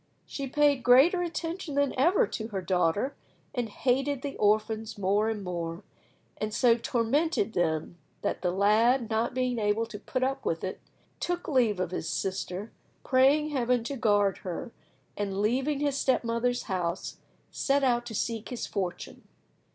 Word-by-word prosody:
She 275 -1 -5
paid 285 0 +3
greater 275 +10 +6
attention 335 -2 -4
than 285 -1 +2
ever 350 - +4
to 220 - -5
her 200 -4 -4
daughter, 185 - +1 0.4
and 245 -4 -2
hated 270 +4 0
the 280 -1 -4
orphans 215 +1 +1
more 205 +3 +1
and 215 -2 -3
more, 170 0 -4 0.5
and 215 0 -3
so 235 +1 +4
tormented 240 - 0
them 160 0 -1 0.2
that - - -1
the 180 - +1
lad, 220 +6 +3
not 225 +2 0
being 250 -2 0
able 210 +2 +1
to 225 -2 -9
put 255 +3 -2
up 270 +1 -1
with 165 - -2
it, 190 - -4 0.4
took 350 0 -2
leave 235 -9 +2
of 185 -2 -2
his 165 - -3
sister, 190 +2 -3 0.3
praying 275 +4 +4
Heaven 250 -3 +1
to 275 +4 -4
guard 205 -5 +2
her, 190 +7 -5 0.4
and, 200 -1 -3
leaving 265 +7 +1
his 285 -1 0
step 260 - +2
mother's 235 +1 0
house, 180 -3 -3 0.3
set 280 0 +1
out 240 -2 +2
to 225 - -6
seek 225 +1 -2
his 250 - -4
fortune. 185 -4 -5
230 Hz, 160 wpm, -28 LUFS, 205-270 Hz, 0.5 s, greater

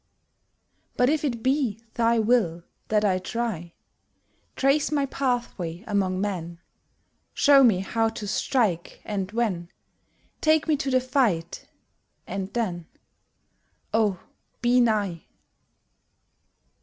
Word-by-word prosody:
But 250 +3 +4
if 310 -1 0
it 240 -6 -2
be 260 -5 +1
thy 235 0 +2
will 215 -7 +2 0.2
That 215 -1 +2
I 185 -2 +2
try, 185 -4 -4 0.8
Trace 275 +3 +2
my 285 -2 +1
pathway 240 -10 -2
among 195 -3 0
men, 175 -4 -3 0.8
Show 280 -1 +6
me 210 -7 +4
how 225 +3 0
to 220 -2 -7
strike, 205 -5 0
and 195 -3 -3
when, 205 -7 -1 0.7
Take 315 0 +3
me 310 - +3
to 275 -1 -2
the 255 -1 +3
fight 235 - 0 0.6
and 195 0 -5
then, 180 -8 -2 1.1
Oh, 210 -5 +2 0.4
be 245 +1 +3
nigh! 205 -7 0
220 Hz, 110 wpm, -25 LUFS, 185-250 Hz, 1.1 s, Show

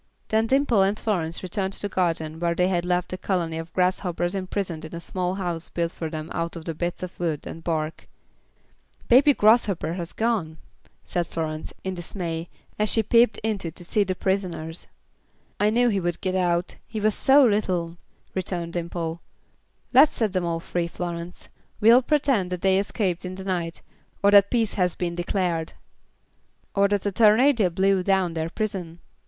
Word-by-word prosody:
Then 220 +1 +2
Dimple 265 -5 +3
and 195 +2 +2
Florence 170 -7 -2
returned 190 +1 -2
to - - -5
the - - 0
garden 165 -4 -1
where 170 0 0
they 180 +1 +2
had 175 -2 0
left 180 0 0
a 185 - -4
colony 170 -4 -1
of 165 0 -8
grasshoppers 180 -1 0
imprisoned 185 -3 -3
in 160 +1 -8
a - - -5
small 180 +1 -2
house 175 -4 -4
built 170 -1 -2
for 160 -2 -5
them 155 0 -6
out 170 +1 -3
of 165 -1 -8
bits 175 +1 -2
of 180 - -4
wood 165 -4 -2
and 165 - -8
bark. 160 -1 -3 1.0
"Baby 270 +3 +6
Grasshopper 205 -7 +3
has 170 -1 -5
gone," 215 -9 -1 0.5
said 175 -2 -2
Florence, 155 -1 -4
in 190 - -2
dismay, 170 -2 -4 0.3
as 210 0 +2
she 225 - +4
peeped 230 +2 +4
in 215 -2 0
to 170 0 -6
see 205 +4 +1
the 185 -1 -2
prisoners. 180 -4 -2 0.7
"I 210 - +3
knew 240 +2 +3
he 200 -3 +1
would 175 -2 -2
get 185 -1 -2
out; 175 -1 0
he 220 - -5
was 215 0 +2
so 275 +5 +5
little," 180 -6 0 0.4
returned 175 -2 -3
Dimple. 170 -1 -4 0.7
"Let's 305 - +7
set 215 -4 -1
them 185 -2 0
all 165 -1 -1
free, 170 0 -2
Florence. 170 0 -6 0.3
We'll 230 +4 +7
pretend 265 -9 +1
that 180 -1 -4
they 190 0 +4
escaped 195 -3 -1
in 185 0 -5
the 190 0 -8
night, 175 -3 -3 0.4
or 200 - +6
that 200 -1 +7
peace 230 -4 +1
has 180 -3 0
been 175 -1 -2
declared." 175 -2 -1 1.0
"Or 200 0 +4
that 200 -1 -1
a 205 - +1
tornado 220 +1 +4
blew 190 +2 +2
down 190 -2 +1
their 160 0 -2
prison." 185 -5 -4
180 Hz, 180 wpm, -25 LUFS, 170-205 Hz, 1.0 s, Let's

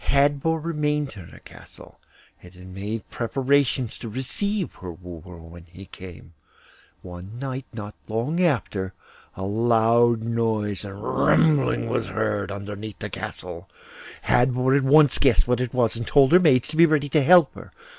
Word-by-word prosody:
Hadvor 145 +3 +2
remained 150 -3 -2
in 90 -5 -11
her - - -15
castle, - - -14 0.4
and 90 - -14
had 90 0 -13
made 100 +3 -6
preparations 130 0 0
to 115 - -7
receive 185 - -3
her 90 -1 -6
wooer 85 0 -11
when 85 +1 -13
he 95 +3 -13
came. 90 -3 -13 0.7
One 90 +5 -10
night, 135 0 -5
not 105 -2 -8
long 120 +11 -2
after, 105 - -1 0.4
a 95 - -4
loud 115 +2 +2
noise 110 -3 -2
and 100 +1 -9
rumbling 150 -5 +2
was 120 - -2
heard 105 -3 -2
under 100 +1 -6
the 105 0 -7
castle. 85 +2 -7 0.5
Hadvor 125 +1 +2
at 140 - +2
once 145 0 +5
guessed 130 -4 +3
what 125 0 +1
it 125 -2 -3
was, 120 -3 +1
and 115 0 -5
told 140 -1 +4
her 180 - +7
maids 135 -9 +3
to 155 - -6
be 170 +1 +7
ready 150 -2 +1
to 150 +2 +3
help 170 +1 +5
her. - - -12
115 Hz, 160 wpm, -23 LUFS, 100-140 Hz, 0.7 s, her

